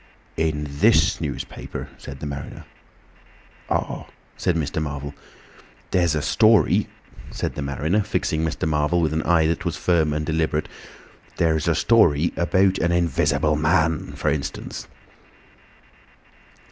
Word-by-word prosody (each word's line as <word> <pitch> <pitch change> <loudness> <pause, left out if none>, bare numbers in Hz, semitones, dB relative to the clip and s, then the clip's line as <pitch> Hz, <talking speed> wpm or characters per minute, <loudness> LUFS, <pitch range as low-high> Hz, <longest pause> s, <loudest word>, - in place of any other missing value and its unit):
"In 80 -2 -1
this 90 +4 +3
newspaper," 75 -4 -6
said 70 -1 -9
the - - -4
mariner. 70 -1 -7 1.0
"Ah!" - - -2 0.3
said 90 - 0
Mr. 80 -1 -2
Marvel. 70 -1 -5 0.8
"There's 85 -4 +2
a 75 - -1
story," 110 +1 +4 0.4
said - - -3
the - - -5
mariner, 75 - 0
fixing 80 -5 -1
Mr. 80 -1 -2
Marvel 75 +3 +1
with 80 -2 +1
an 80 - 0
eye 80 0 +3
that 85 +1 0
was 85 -3 -2
firm 80 -4 +2
and 75 +1 -2
deliberate; 80 -1 0 0.7
"there's 80 -2 +1
a 85 - +3
story 85 -6 +3
about 95 +3 +2
an 85 - +1
Invisible 75 -3 +1
Man, 80 +1 +1
for - - -1
instance." - - -5
80 Hz, 130 wpm, -23 LUFS, 75-85 Hz, 1.0 s, story